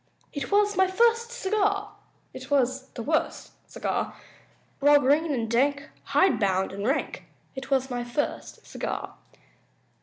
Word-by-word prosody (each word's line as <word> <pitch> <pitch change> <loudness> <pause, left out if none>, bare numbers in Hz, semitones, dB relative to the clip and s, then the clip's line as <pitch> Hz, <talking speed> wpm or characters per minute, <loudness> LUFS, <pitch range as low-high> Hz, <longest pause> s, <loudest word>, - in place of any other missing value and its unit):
It 285 - -5
was 415 0 +3
my 380 0 +4
first 465 +4 +2
cigar! 410 -2 -1 0.4
It 260 +1 -9
was 265 -1 +1
the 235 - -5
worst 310 +4 -1 0.2
cigar! - - -3 0.6
Raw, 290 +1 +6
green 290 +4 +2
and 235 -5 -1
dank, 280 +5 0
hide 380 -1 +3
bound 190 -2 +1
and 200 +2 -3
rank 275 +4 -2 0.3
It 270 0 -8
was 265 -1 +1
my 245 -1 -2
first 240 +5 -4
cigar! - - -5
285 Hz, 140 wpm, -26 LUFS, 255-380 Hz, 0.6 s, Raw